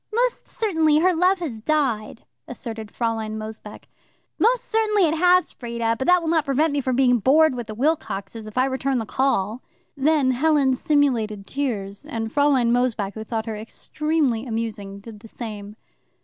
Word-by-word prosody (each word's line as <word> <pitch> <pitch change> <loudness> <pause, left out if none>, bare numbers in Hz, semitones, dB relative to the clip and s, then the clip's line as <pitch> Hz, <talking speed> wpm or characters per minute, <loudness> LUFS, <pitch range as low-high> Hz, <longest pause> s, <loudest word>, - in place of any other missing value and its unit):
"Most 485 +2 0
certainly 320 -8 +1
her 365 +4 +3
love 365 +3 +3
has 240 -10 -5
died," 235 -7 -1 0.2
asserted 225 -3 -7
Fraulein 225 -2 -2
Mosebach. 215 -1 -9 0.5
"Most 485 +1 +2
certainly 425 -3 +2
it 310 - 0
has, 360 +2 +3
Frieda, 235 -2 -2
but 265 - -2
that 360 -1 +5
will - - -3
not 320 -1 +2
prevent 285 +2 +1
me 285 - 0
from 260 -1 -1
being 250 -2 +3
bored 300 +6 +4
with 240 -2 -5
the 215 - -7
Wilcoxes 230 -6 -2
if 215 - -10
I 255 - +4
return 265 0 -1
the 225 - -2
call." 235 -2 0 0.3
Then 280 -1 +2
Helen 275 0 +2
simulated 245 -8 0
tears, 205 -7 -4
and 225 -1 -4
Fraulein 280 -5 +3
Mosebach, 235 -5 0
who 220 - -6
thought 220 0 -3
her 225 - -4
extremely 265 +3 -2
amusing, 210 -4 -4
did 215 0 -11
the 225 - -13
same. 210 -3 -8
255 Hz, 170 wpm, -23 LUFS, 220-310 Hz, 0.5 s, that